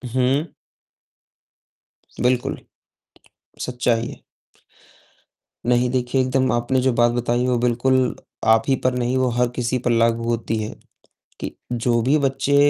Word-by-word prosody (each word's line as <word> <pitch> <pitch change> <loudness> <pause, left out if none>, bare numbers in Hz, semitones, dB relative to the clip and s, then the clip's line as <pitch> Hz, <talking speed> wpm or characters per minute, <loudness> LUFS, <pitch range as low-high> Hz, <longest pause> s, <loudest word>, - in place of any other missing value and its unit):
हुँ। 135 +5 +1 1.7
बिल्कुल। 125 0 +1 1.0
सच्चाई 120 -2 0
है। - - -11 1.4
नहीं 125 +1 +2
देखिए, 130 +1 0
एकदम 130 0 +1
आपने 120 +2 +1
जो 130 0 +2
बात 120 0 +3
बताई 120 +1 0
वो 125 -1 +2
बिल्कुल 125 +2 +1 0.4
आप 110 0 +3
ही 135 - +3
पर 130 - +3
नहीं, 125 +1 0
वो 130 0 +2
हर 125 +1 +2
किसी 125 0 0
पर 120 0 0
लागू 115 0 +2
होती 115 -1 -1
है 105 - -6 0.7
कि - - -6 0.2
जो 120 0 +1
भी 135 +6 +3
बच्चे 135 0 0
125 Hz, 130 wpm, -22 LUFS, 120-130 Hz, 1.7 s, बात